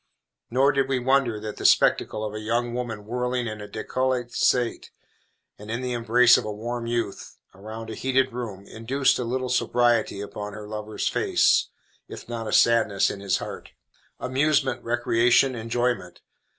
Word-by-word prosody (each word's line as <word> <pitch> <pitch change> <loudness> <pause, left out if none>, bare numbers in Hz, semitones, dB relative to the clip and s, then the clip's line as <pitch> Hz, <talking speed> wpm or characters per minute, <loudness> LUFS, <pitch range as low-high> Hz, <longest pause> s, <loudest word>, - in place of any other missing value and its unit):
Nor 135 +4 +3
did 135 -1 0
we 135 - +1
wonder 125 -3 +1
that 105 0 -7
the - - -7
spectacle 110 - +3
of 105 - -5
a 110 - -5
young 120 +2 -1
woman 115 -4 -4
whirling 125 +2 -2
in 110 -2 -5
a 105 - -7
décolleté 125 +2 -2
state, 125 -2 +1 0.7
and 105 +1 -11
in 115 +2 -3
the 125 -1 -2
embrace 120 +1 +5
of - - -5
a 105 - -4
warm 115 +3 -5
youth, 115 -4 -3 0.2
around 110 +3 -8
a - - -5
heated 130 +2 0
room, 105 -6 -6
induced 130 +7 0
a - - -1
little 130 +2 -2
sobriety 120 -4 +1
upon 105 0 -6
her 105 -1 -8
lover's 105 0 -4
face, - - +2 0.4
if - - -10
not 115 -2 -5
a - - -3
sadness 110 -4 +3
in 100 - -7
his 100 -1 0
heart. - - -8 0.5
Amusement, 135 0 +1
recreation, 120 +2 +3
enjoyment! 115 -5 -2
120 Hz, 165 wpm, -25 LUFS, 110-125 Hz, 0.7 s, embrace